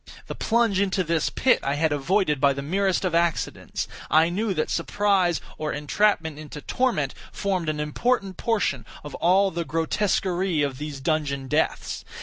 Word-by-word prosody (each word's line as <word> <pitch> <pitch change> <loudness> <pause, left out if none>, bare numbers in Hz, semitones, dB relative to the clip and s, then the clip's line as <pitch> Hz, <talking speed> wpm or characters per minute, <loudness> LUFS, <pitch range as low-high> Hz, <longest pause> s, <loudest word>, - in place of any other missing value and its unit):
The - - -5
plunge 230 -4 +1
into 195 -1 +1
this 165 -1 0
pit 260 - +3
I 140 +1 -1
had 160 +1 +1
avoided 150 0 +1
by 140 -1 +5
the 140 0 -5
merest 190 +5 0
of 180 - -1
accidents, 170 0 -1 0.2
I 160 +2 +5
knew 205 +4 -1
that 155 - -1
surprise, 185 -1 +1 0.2
or 155 -1 -2
entrapment 160 0 +1
into 150 -1 -8
torment, 150 - 0 0.2
formed 185 -5 -1
an 150 -1 -2
important 195 +6 0
portion 205 - 0 0.2
of 150 - -8
all 190 +3 +3
the 170 +1 -2
grotesquerie 175 0 0
of 140 -2 -2
these 145 -2 -6
dungeon 140 -3 -1
deaths. - - -1
170 Hz, 160 wpm, -25 LUFS, 150-195 Hz, 0.2 s, by